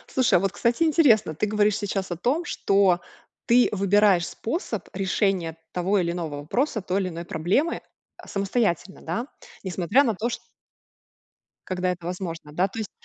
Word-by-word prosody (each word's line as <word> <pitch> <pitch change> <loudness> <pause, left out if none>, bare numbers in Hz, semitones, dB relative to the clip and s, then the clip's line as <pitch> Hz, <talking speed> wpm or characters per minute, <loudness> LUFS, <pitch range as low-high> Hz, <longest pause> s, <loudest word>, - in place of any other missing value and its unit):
Слушай, 260 -2 +4
а - - +6
вот, 195 +1 0
кстати, 235 +7 +1
интересно! 260 - +4
Ты 210 - 0
говоришь 210 -1 +2
сейчас 195 -2 -3
о - - -1
том, 265 - 0
что 195 - +2 0.4
ты 245 +1 +5
выбираешь 200 -2 +3
способ 230 - -4
решения 190 -3 0
того 185 +4 +1
или 170 -2 0
иного 165 -4 -4
вопроса, 220 - -1
той 190 +2 -1
или 185 - -2
иной 170 0 -7
проблемы 185 - 0 0.4
самостоятельно, 195 -2 -1
да. 235 +3 -3 0.4
Несмотря 190 - +2
на 230 -6 0
то, 225 +5 -2
чт 235 - -4 1.3
Когда 185 0 0
это 175 -1 -7
возможно, 170 -4 -5
да, 180 +5 +2
то 225 - -7
есть. 215 - -4
195 Hz, 160 wpm, -25 LUFS, 175-225 Hz, 1.3 s, а